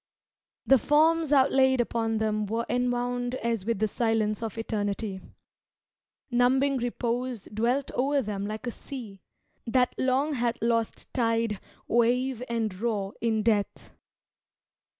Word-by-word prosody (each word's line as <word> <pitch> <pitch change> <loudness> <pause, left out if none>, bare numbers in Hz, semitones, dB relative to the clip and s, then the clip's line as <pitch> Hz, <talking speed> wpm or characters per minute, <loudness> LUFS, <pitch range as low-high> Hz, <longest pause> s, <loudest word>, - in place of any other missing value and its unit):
The 270 -1 +6
forms 315 +3 +3
outlaid 265 -2 +4
upon 225 -1 0
them 215 -1 0
were 230 +3 -1
enwound 245 0 -1
As 230 -5 -2
with 230 - +1
the 215 +2 +1
silence 220 -1 0
of 225 -2 -5
eternity. 205 -3 -3 1.1
Numbing 265 +3 +3
repose 245 -1 -2
dwelt 235 +7 -1
o'er 275 +2 +1
them 205 -2 -3
like 215 +3 -5
a 240 - -2
sea, 225 -8 -9 0.5
That 250 +2 +2
long 265 +4 +1
hath 240 -2 0
lost 230 -1 -1
tide, 230 -4 +1 0.3
wave 245 +2 +2
and 225 -3 -1
roar, 205 -4 -1
in 220 -2 +1
death. 210 -3 0
235 Hz, 125 wpm, -27 LUFS, 220-255 Hz, 1.1 s, The